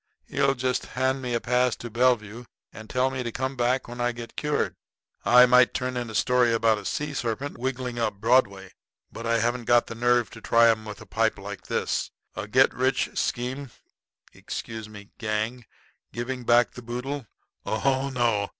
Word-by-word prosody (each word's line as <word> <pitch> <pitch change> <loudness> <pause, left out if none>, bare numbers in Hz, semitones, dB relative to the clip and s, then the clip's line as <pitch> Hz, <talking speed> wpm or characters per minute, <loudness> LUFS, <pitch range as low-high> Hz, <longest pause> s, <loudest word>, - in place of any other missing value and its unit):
He'll 135 0 +1
just 130 0 -1
hand 130 +1 +1
me 125 -2 -2
a - - +1
pass 125 +1 +1
to 120 - -8
Bellevue 120 -1 +1 0.3
and 110 0 -11
tell 130 +1 +1
me 130 -1 -3
to 120 -1 -3
come 130 +3 -3
back 125 +1 0
when 120 0 -6
I 120 0 +1
get 120 -1 -9
cured. 150 0 -1 0.5
I 125 +1 +8
might 125 0 +5
turn 125 0 -2
in 120 -2 -3
a 110 - -7
story 125 0 +3
about 115 -1 +2
a - - -11
sea 150 0 -2
serpent 130 +1 -3
wiggling 125 -1 -3
up 115 - 0
Broadway, 100 -4 +2 0.4
but 115 - -6
I 115 0 +3
haven't 120 +1 -1
got 120 0 +4
the - - -7
nerve 120 -1 +2
to 115 - -11
try 115 0 +5
'em 110 -1 -3
with 105 -1 -8
a - - -10
pipe 110 -1 0
like 100 -1 -8
this. - - -1 0.3
A - - -5
get - - +4
rich - - +1
quick - - -13
scheme 130 +3 -2 0.6
excuse 110 -1 -6
me 105 -1 -12
gang 110 +1 -2 0.4
giving 120 +1 -4
back 120 -1 +4
the 125 - -10
boodle! 125 +2 -5 0.4
Oh, 135 +4 0
no. 115 -5 +1
120 Hz, 190 wpm, -26 LUFS, 115-125 Hz, 0.6 s, I